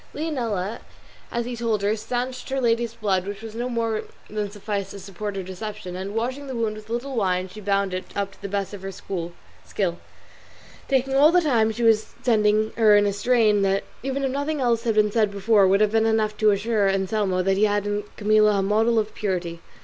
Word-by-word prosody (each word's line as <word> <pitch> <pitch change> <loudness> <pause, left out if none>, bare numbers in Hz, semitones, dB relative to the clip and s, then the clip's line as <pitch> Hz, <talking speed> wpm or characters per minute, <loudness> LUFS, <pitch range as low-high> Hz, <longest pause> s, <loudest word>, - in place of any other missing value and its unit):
Leonela, 235 - -2 0.5
as 235 0 -1
he 245 0 -4
told 225 -3 -1
her, 205 +2 +2
stanched 250 +4 -4
her 270 0 -1
lady's 235 -1 +1
blood, 195 -4 0
which 205 +1 -6
was 220 -1 -7
no 240 +2 -3
more 230 -2 -1 0.3
than 210 -1 -2
sufficed 205 -1 -4
to - - -8
support 200 +2 -6
her 195 - -3
deception; 190 0 -7
and 195 +3 -5
washing 260 +5 -2
the 260 - -5
wound 225 -2 -1
with 215 0 -12
a - - -7
little 255 +3 -3
wine 185 -4 0
she 205 +3 -11
bound 200 -1 0
it 185 - -3
up 200 -1 -2
to - - -20
the 200 - -5
best 200 0 -2
of 200 - -7
her 195 0 -5
skill, 175 -2 -5 1.6
talking 270 0 +1
all 290 +4 +6
the 360 - +5
time 235 -8 +2
she 235 +2 -4
was 220 -1 +3
tending 215 -2 +3
her 215 -2 +6
in 205 - +4
a 200 - +1
strain 215 -1 +3
that, 195 0 +1 0.2
even 270 +1 -2
if 265 - 0
nothing 285 +3 -2
else 235 -2 +1
had 225 -2 +1
been 210 -1 +3
said 215 -1 +2
before, 200 0 +3
would 195 +2 +3
have 210 -1 +3
been 225 0 +3
enough 215 -1 +1
to 215 0 +3
assure 205 0 +1
Anselmo 190 -1 0
that 195 +1 +1
he 210 - +4
had 205 -1 0
in 205 0 -1
Camilla 215 -1 +4
a 195 - +1
model 220 +4 +2
of 215 -1 0
purity. 175 -4 -3
215 Hz, 220 wpm, -24 LUFS, 200-230 Hz, 1.6 s, all